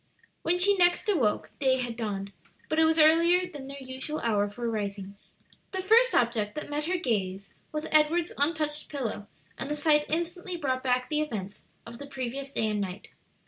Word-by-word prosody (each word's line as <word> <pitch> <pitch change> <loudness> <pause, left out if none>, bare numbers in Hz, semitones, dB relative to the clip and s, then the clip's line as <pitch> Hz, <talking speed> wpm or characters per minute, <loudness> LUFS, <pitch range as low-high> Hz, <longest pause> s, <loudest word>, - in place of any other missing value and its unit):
When 345 +2 +1
she 400 +3 +4
next 350 +3 +3
awoke 260 - +1
day 260 -2 +3
had 245 -2 -3
dawned, 200 -3 -4 0.4
but 315 - +1
it 320 - +6
was 320 0 +2
earlier 335 +3 +5
than 290 -6 -9
their 275 0 -8
usual 265 +3 -5
hour 205 -3 +1
for 235 +3 -5
rising. 200 -3 -4 0.6
The 380 - -1
first 465 +5 +5
object 225 -3 +1
that 300 -1 -6
met 295 +1 -1
her 365 +2 0
gaze 195 - -2 0.2
was 305 0 -3
Edward's 315 +2 +3
untouched 300 0 0
pillow, 235 -7 -4 0.3
and 275 - -4
the 295 - -1
sight 295 0 +3
instantly 345 +2 -2
brought 260 -5 -1
back 250 -1 +1
the 305 0 +2
events 210 -9 -5 0.2
of 235 +1 -10
the 285 - -8
previous 270 0 -5
day 220 - 0
and 210 -1 -1
night. 190 +1 -6
275 Hz, 185 wpm, -28 LUFS, 225-320 Hz, 0.6 s, it